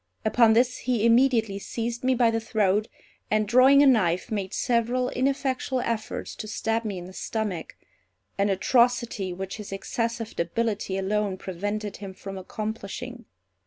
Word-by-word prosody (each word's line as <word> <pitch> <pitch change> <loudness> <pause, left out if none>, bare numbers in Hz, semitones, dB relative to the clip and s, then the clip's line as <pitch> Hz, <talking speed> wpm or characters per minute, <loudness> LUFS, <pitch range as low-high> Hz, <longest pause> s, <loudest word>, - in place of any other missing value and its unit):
Upon 225 0 +5
this 250 +2 +3
he 240 -3 0
immediately 230 -4 +3
seized 235 +3 -4
me 260 0 +3
by 235 -2 +4
the 225 - 0
throat, 215 -1 +1 0.4
and 215 0 +1
drawing 265 +5 +6
a - - +6
knife, 190 -10 +3
made 200 -3 -2
several 245 +2 +1
ineffectual 265 0 0
efforts 230 -2 -3
to 215 - -6
stab 225 +1 -1
me 205 -4 -3
in 175 - -7
the 185 - -11
stomach; 205 -6 -4 0.6
an 200 +1 +1
atrocity 235 -1 +2
which 190 +3 -5
his 210 -2 -8
excessive 230 +3 -3
debility 200 +2 -1
alone 200 0 -1
prevented 205 +3 -4
him 195 -2 -8
from 195 0 -7
accomplishing. 220 +5 -6
220 Hz, 150 wpm, -26 LUFS, 195-240 Hz, 0.6 s, drawing